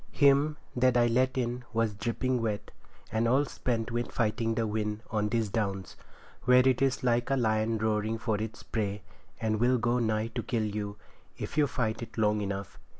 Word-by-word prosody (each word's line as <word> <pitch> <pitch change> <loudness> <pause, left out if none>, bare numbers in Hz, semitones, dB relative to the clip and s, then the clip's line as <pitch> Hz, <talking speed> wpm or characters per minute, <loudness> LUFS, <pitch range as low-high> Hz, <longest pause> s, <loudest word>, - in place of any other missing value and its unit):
Him 145 +1 +4 0.2
that 125 0 +3
I 120 - +5
let 130 +3 +2
in 125 0 -1
was 115 -2 +1
dripping 120 +4 -1
wet, 105 -2 -2 0.4
and 110 +1 +1
all 135 +5 +3
spent 115 -4 -2
with 120 +1 -2
fighting 115 0 0
the 115 - +1
wind 105 0 -2
on 105 -1 0
these 115 -1 +1
Downs, 100 -3 -2 0.5
where 125 +1 +6
it 130 -1 +3
is 135 -2 +1
like 120 0 +2
a 135 - +3
lion 110 -2 +1
roaring 110 +1 0
for 110 -2 -1
its 110 +1 -6
prey, 105 -3 -2 0.4
and 110 -1 0
will 125 +2 +4
go 120 +1 +1
nigh 110 -1 0
to - - -3
kill 115 -3 -1
you, 105 -1 -4 0.4
if - - -5
you 150 -1 +4
fight 115 -4 -2
it 115 - -8
long 105 -1 +2
enough. 100 -1 -4
115 Hz, 190 wpm, -29 LUFS, 110-125 Hz, 0.5 s, where